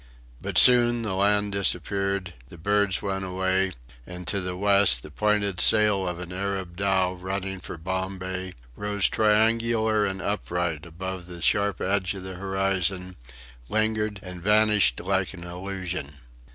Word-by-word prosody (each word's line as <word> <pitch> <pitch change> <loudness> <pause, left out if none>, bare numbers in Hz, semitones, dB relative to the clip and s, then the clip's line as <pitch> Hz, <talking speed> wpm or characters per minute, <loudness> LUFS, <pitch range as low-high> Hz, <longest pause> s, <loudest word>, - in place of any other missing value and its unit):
But - - -3
soon 120 -1 +6
the 105 -4 -3
land 100 +1 +2
disappeared, 100 0 -1
the 85 - -13
birds 100 +2 +1
went 95 -1 -2
away; 95 0 0 0.3
and 90 0 -8
to 100 +3 0
the 90 0 -4
west 100 -10 +4
the 75 - -11
pointed 100 0 0
sail 105 -3 +4
of 90 -1 -3
an 90 0 -8
Arab 95 -2 -4
dhow 95 -1 +1
running 95 +1 -4
for 85 - -8
Bombay, 95 +1 -4 0.2
rose 100 +1 +1
triangular 110 0 +2
and 95 0 -4
upright 90 -5 -3
above 90 +2 -6
the 90 -1 -9
sharp 100 +2 +1
edge 95 -1 0
of 95 - -8
the 95 0 -7
horizon, 95 -1 -1 0.5
lingered 110 -1 0
and 90 -2 -8
vanished 105 - +3
like 95 +1 -1
an 85 - -10
illusion. 90 -3 -6
95 Hz, 145 wpm, -25 LUFS, 90-100 Hz, 0.5 s, soon